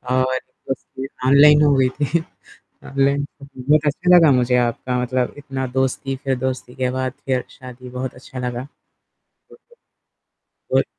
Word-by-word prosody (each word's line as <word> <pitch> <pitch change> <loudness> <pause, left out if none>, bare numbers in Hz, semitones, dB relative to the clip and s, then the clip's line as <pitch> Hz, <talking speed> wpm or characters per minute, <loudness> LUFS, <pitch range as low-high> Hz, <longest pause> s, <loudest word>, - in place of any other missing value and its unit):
और 130 0 +1
दोस्ती 135 0 -7 0.2
ऑनलाइन 150 +2 +7
हुई 135 -3 +4
थी। 150 +5 -1 0.7
ऑनलाइन 140 +1 +1 0.2
बहुत 140 +2 0
अच्छा 180 +5 +4
लगा 165 -4 +7
मुझे 125 -1 +3
आपका 125 +1 0
मतलब 125 0 -1
इतना 135 -2 -4
दोस्ती 130 +1 -1
फ़िर 135 -1 -2
दोस्ती 130 -1 -4
के 130 -1 -1
बाद 130 0 -2
फिर 130 -2 0
शादी 125 0 -11
बहुत 125 +1 -5
अच्छा 125 0 -10
लगा। 125 -1 -3 0.7
बिल्कुल, 475 +1 -23 1.0
और - - +3
130 Hz, 135 wpm, -21 LUFS, 125-140 Hz, 1.0 s, ऑनलाइन